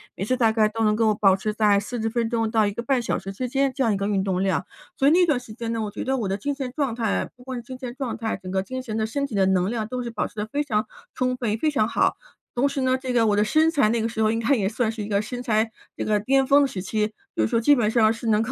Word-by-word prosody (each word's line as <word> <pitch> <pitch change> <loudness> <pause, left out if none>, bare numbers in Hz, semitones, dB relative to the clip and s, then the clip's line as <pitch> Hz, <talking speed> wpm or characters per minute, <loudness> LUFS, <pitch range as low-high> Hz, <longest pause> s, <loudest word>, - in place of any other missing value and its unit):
每 - - -4
次 255 +4 +1
大 230 -3 +3
概 220 -1 +3
都 225 +1 -2
能 210 -1 +3
够 220 -1 +2
保 195 -2 +4
持 210 +2 -3
在 210 -2 +3
40 225 +2 -3
分 230 0 -1
钟 225 -2 0
到 220 -2 +3
1 - - -1
个 235 +4 -5
半 265 -1 +1
小 235 - -1
时 195 +1 -6
之 250 +6 -4
间 275 +1 +1
这 270 - 0
样 225 -3 +2
一 - - -1
个 200 +1 -2
运 200 -2 +1
动 190 -2 -1
量。 195 - +1 0.5
所 270 - +3
以 - - +6
那 355 +2 +5
段 295 -7 +1
时 230 -3 -11
间 230 0 -4
呢， 225 - -2
我 210 -1 -3
觉 205 - -5
得 265 0 0
我 220 - -2
的 195 +1 -1
精 285 +8 -2
神 265 -3 -4
状 280 -6 0
态 225 -3 -1
不 250 - -17
光 260 0 -5
是 240 - -6
精 255 +2 -8
神 250 -2 -6
状 265 -4 -4
态， 225 -1 -2
整 185 - -7
个 190 0 +1
精 260 +6 -5
神 225 -4 -5
的 220 - 0
身 280 +6 -2
体 235 -7 -6
的 195 - +3
能 190 0 +2
量 225 -2 -2
都 250 +2 -4
是 235 - -4
保 225 -2 -2
持 - - -20
得 210 - -2
非 285 +6 -1
常 215 -7 -1 0.3
充 255 0 0
分 240 -4 -1
也 215 - 0
非 310 - +1
常 220 -7 +2
好。 - - +1 0.4
同 255 +4 +2
时 275 -1 -2
呢， 260 0 +2
这 260 -1 -3
个 230 -2 +3
我 205 - +3
的 205 - +3
身 310 +9 +3
材 280 -9 +3
那 230 0 +1
个 225 - -1
时 220 -1 -3
候 215 0 +3
应 225 - -1
该 230 +5 +2
也 200 -5 0
算 225 +1 0
是 220 -2 -5
一 - - -6
个 200 -1 +1
身 245 +3 -6
材 225 -2 +1 0.2
这 - - -3
个 210 -1 +1
巅 270 +6 +2
峰 285 +2 +5
的 - - +2
时 200 -8 -5
期， 215 +3 -1 0.2
就 110 - +1
是 - - +2
说 230 - +1
基 290 +5 +5
本 230 -5 +1
上 220 -2 +4
是 230 +1 -5
能 215 -1 +3
够 225 - -3
225 Hz, 355 characters per minute, -24 LUFS, 210-255 Hz, 0.5 s, 以